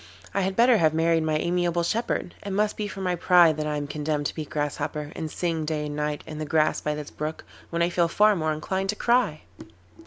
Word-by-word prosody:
I 200 - +1
had 190 0 -1
better 235 +1 +5
have 160 -3 +3
married 165 0 +3
my 155 -1 +1
amiable 175 +1 0
shepherd. 215 -1 -1
It 200 - -5
must 210 +2 0
be 210 - -3
for 195 -1 -7
my 180 -1 0
pride 175 -2 +5
that 155 0 -2
I 150 -1 -1
am 145 - -3
condemned 150 0 -2
to - - -1
be 160 - -5
a - - -5
Grasshopper, 150 0 -3
and 160 - -4
sing 165 -1 -2
day 150 -1 -2
and 145 0 -5
night 150 0 -2
in 155 -1 -7
the - - -2
grass 155 +1 +1
by 150 0 -1
this 150 -1 -7
brook, 155 +1 -5 0.3
when 170 0 0
I 170 - +2
feel 175 -1 +2
far 210 +5 +4
more 155 -3 0
inclined 190 +5 -2
to 210 - +1
cry. 235 -10 +1
160 Hz, 245 wpm, -25 LUFS, 150-185 Hz, 0.3 s, better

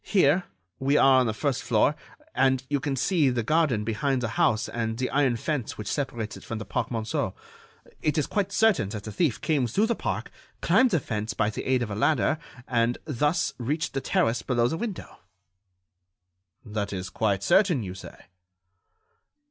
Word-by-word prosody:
Here, 180 -2 +3 0.3
we 140 +2 +2
are 135 -1 +6
on 125 - +2
the - - +1
first 135 +3 -1
floor, 120 +6 +2 0.4
and 130 0 +2
you 145 - +2
can 135 +1 -2
see 150 +1 +2
the 120 -2 -1
garden 145 -5 +2
behind 125 +4 -1
the 120 - -1
house 125 -4 +1
and 115 -1 -3
the 130 +1 -2
iron 135 -3 +2
fence 130 0 -3
which 105 - -6
separates 120 -7 -3
it - - -12
from 115 - -5
the 110 - -6
Parc - - -2
Monceau. 110 -2 -2 0.7
It 155 +1 0
is 150 - +2
quite 200 -1 -1
certain 220 - +3
that 105 -1 -6
the 110 - -6
thief 140 - 0
came 145 -6 +1
through 200 - +2
the 235 - +1
park, - - -4 0.3
climbed 260 0 +4
the 175 -7 +2
fence 110 -4 -4
by 105 - +1
the - - -6
aid 130 -2 +2
of 110 - -5
a - - -3
ladder, 135 +4 +2 0.3
and 120 -1 +1
thus 150 +2 0
reached 150 +8 -2
the 135 - -2
terrace 115 -2 +1
below 120 -2 +1
the 160 - -2
window." 210 0 -6 1.5
"That 105 -2 -3
is 95 -1 -5
quite 100 -3 0
certain, 175 - +3
you 90 -2 -5
say?" 95 - -12
130 Hz, 190 wpm, -26 LUFS, 110-150 Hz, 1.5 s, are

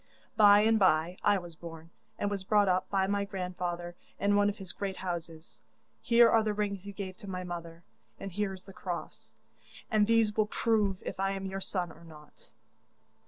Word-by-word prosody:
'By 205 -1 +7
and 220 +1 +3
bye 175 -1 +3
I 205 -1 +4
was 175 -3 -8
born, 165 0 -10 0.3
and 205 - -1
was 200 -2 -3
brought 205 +1 +3
up 185 0 +1
by 195 -1 +2
my 200 +1 0
grandfather 180 -3 -4 0.2
in 205 0 +2
one 205 0 +4
of 205 - -5
his 190 -4 -8
great 195 -2 -4
houses. 170 -3 -6 0.4
Here 235 -1 +6
are 225 0 +4
the 215 -1 -1
rings 200 -2 -2
you - - -5
gave 190 -2 -6
to 205 -3 -9
my 185 -1 -4
mother, 170 -1 -7 0.4
and 195 - -6
here 205 +2 -1
is 185 - -14
the 195 - -13
cross, 180 -3 -7 0.6
and 210 -2 +4
these 225 -2 +3
will 215 -1 +2
prove 210 -4 0
if - - -6
I 195 0 +1
am 195 0 -5
your 195 0 -4
son 180 -3 -3
or 165 +1 -16
not. 150 -2 -16
195 Hz, 200 wpm, -30 LUFS, 175-205 Hz, 0.6 s, By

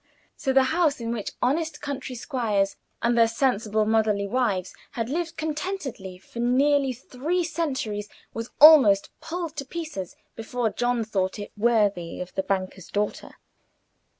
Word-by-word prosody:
So 270 - -1
the 265 0 +5
house 320 -5 +2
is 230 - -6
which 230 -3 -3
honest 310 +4 0
country 275 -3 -5
squires 225 -6 0 0.3
and 235 +1 +3
their 230 -1 +5
sensible 225 -3 +1
motherly 215 -2 +2
wives 200 -5 0 0.2
had 230 0 -3
lived 330 +1 -2
contentedly 300 - -4
for 195 +5 -11
nearly 270 +3 +3
three 270 +8 -2
centuries 260 -11 -2 0.2
was 230 +1 -5
almost 275 -11 +8
pulled 335 -1 -4
to 280 - -2
pieces 305 - -6 0.2
before 225 0 -2
John 240 +2 0
thought 195 -3 -1
it 205 - -7
worthy 205 -6 +1
of 180 0 -6
the 190 - 0
banker's 190 -1 -3
daughter. 205 0 -3
235 Hz, 145 wpm, -25 LUFS, 205-290 Hz, 0.3 s, almost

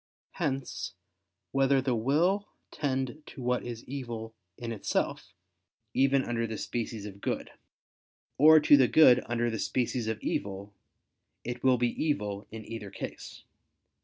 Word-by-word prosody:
Hence, 135 - -3 0.6
whether 135 0 +3
the 130 -1 0
will 160 - +1 0.2
tend 135 0 -2
to 135 - -10
what 125 0 0
is 120 -2 -6
evil 120 -4 -5 0.2
in 120 -1 -5
itself, 110 - -2 0.6
even 135 0 +3
under 115 -1 -1
the 110 -1 -5
species 115 -3 -4
of 100 -1 -9
good; - - -3 0.9
or 155 +2 +9
to 145 -1 +7
the 130 -2 +5
good 125 -5 +7
under 120 0 0
the 110 - -3
species 125 -2 -1
of 110 0 -2
evil, 100 +1 -3 0.7
it 120 0 -5
will 130 -1 +5
be 120 -1 0
evil 105 -9 -2
in 110 -1 -8
either 110 -3 -7
case. - - -8
120 Hz, 140 wpm, -29 LUFS, 110-135 Hz, 0.9 s, or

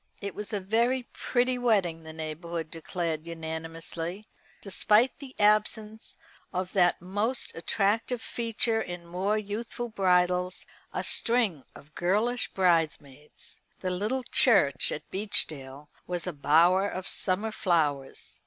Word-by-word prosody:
It 200 -1 -5
was 210 +2 -7
a 205 - -1
very 235 +6 +1
pretty 250 0 +1
wedding, 195 -9 +2
the 160 0 -9
neighbourhood 160 +1 -5
declared 165 -1 -3
unanimously; 165 +3 -6 0.3
despite 210 +5 +2
the 270 -2 -10
absence 215 +1 +1 0.3
of 185 0 -3
that 175 -2 +3
most 205 +7 -1
attractive 215 +7 0
feature 230 -1 0
in 175 -3 -6
more 185 +5 0
youthful 220 +3 -4
bridals 180 -2 +1 0.3
a - - -3
string 230 - +2
of 150 +2 -15
girlish 215 +7 0
bridesmaids. 150 -6 -1 0.2
The 185 - -1
little 215 +8 -1
church 205 - +3
at - - -5
Beechdale 150 -8 -1 0.2
was 175 -1 -2
a 180 - -3
bower 170 +7 +4
of 185 -1 -5
summer 205 +4 +1
flowers. 150 -9 -1
185 Hz, 125 wpm, -28 LUFS, 165-215 Hz, 0.3 s, bower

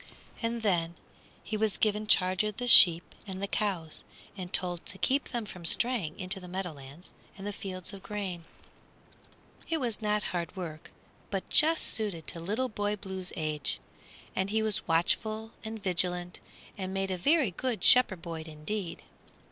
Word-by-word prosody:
And 230 -1 -2
then 170 -4 +1 0.5
he 220 - -4
was 215 -1 +1
given 215 0 +1
charge 185 0 +4
of 210 -1 -3
the 245 - -3
sheep 175 -7 +8
and 190 -1 -5
the 200 - -1
cows, 190 -6 -2 0.3
and 185 -2 -7
told 175 -2 -1
to 190 - -5
keep 270 +7 +1
them 240 -3 -3
from 180 -4 -10
straying 200 -2 +2
into 185 0 -3
the 180 - -10
meadowlands 175 -4 -7 0.2
and 195 - -8
the 205 - -3
fields 185 -1 -4
of 195 - -9
grain. 190 -5 -5 1.2
It 325 -1 +1
was 235 -5 -1
not 210 0 +1
hard 170 -2 -3
work, 165 -4 -7 0.4
but 195 -2 -3
just 320 +1 +5
suited 200 -8 -1
to 170 - -3
Little 210 +10 -1
Boy 205 -1 -1
Blue's 190 -2 -5
age, 150 -4 -2 0.6
and 190 +1 0
he 220 +1 +1
was 215 -2 0
watchful 215 +7 +1
and 220 -1 -6
vigilant 180 -1 +1 0.4
and 190 0 -3
made 195 0 -1
a - - 0
very 285 - +3
good 225 0 -3
shepherd 210 -9 +5
boy 165 -2 -5
indeed. 165 +4 -4
190 Hz, 165 wpm, -30 LUFS, 175-215 Hz, 1.2 s, sheep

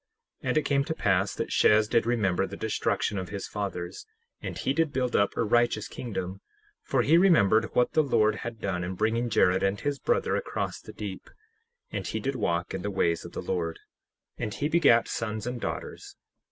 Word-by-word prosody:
10:2 - - -2
And - - +2
it 155 - +2
came 140 -1 +2
to 160 0 -3
pass 100 -4 +1
that - - -3
Shez 105 0 +4
did 115 0 +2
remember 105 -7 +1
the - - -8
destruction 100 - -1
of 95 - -6
his 100 -1 -5
fathers, 95 - -5 0.3
and - - -5
he 135 - 0
did 160 0 +1
build 125 -2 -1
up 100 - +2
a - - +2
righteous 115 -1 +2
kingdom; 100 -5 -5 0.4
for - - +1
he 165 +4 +5
remembered 110 - +4
what 125 - +3
the 155 - +5
Lord 110 -6 +2
had 120 -1 -6
done 90 -4 -2
in 90 +1 -4
bringing 115 +4 0
Jared 95 -3 +3
and 95 +1 +1
his 145 -1 -2
brother - - +1
across - - -3
the - - -10
deep; 100 -3 -7 0.6
and - - -3
he 110 - -2
did 135 +5 -2
walk 85 -7 -1
in 95 - -3
the 105 - -2
ways 85 -4 0
of 85 - -10
the - - -5
Lord; 85 -3 -2 0.6
and 110 - -2
he 145 - -1
begat 150 -8 +4
sons 110 -2 -3
and 125 -1 -4
daughters. - - -5
110 Hz, 205 wpm, -28 LUFS, 95-125 Hz, 0.6 s, he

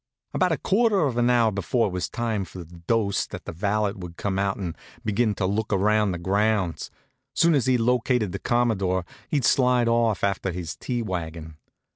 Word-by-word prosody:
About 185 -1 +2
a 160 - +1
quarter 210 0 +2
of 140 -6 +1
an 120 0 +3
hour 120 -3 +4
before 105 +4 0
it 100 - -2
was 90 0 -3
time 115 -4 -2
for 90 0 -9
the 85 +1 -14
dose 110 -4 +1
the - - -7
valet 105 +4 0
would 90 -3 -9
come 95 -1 -2
out 100 0 0
and 90 -5 -4 0.3
begin 110 0 +1
to 95 - -1
look 105 +3 -1
around 105 +1 +2
the 90 - -3
grounds. 100 -1 0 0.5
Soon 170 0 +4
as 135 -4 +2
he'd 130 -1 +4
located 125 -3 +1
the - - -4
Commodore 100 -7 +1 0.2
he'd 140 -5 +1
slide 125 -3 +3
off 115 -3 +2
after 100 -1 0
his 85 -3 -5
tea 120 +5 -3
wagon. 80 -5 -5
105 Hz, 190 wpm, -25 LUFS, 95-120 Hz, 0.5 s, hour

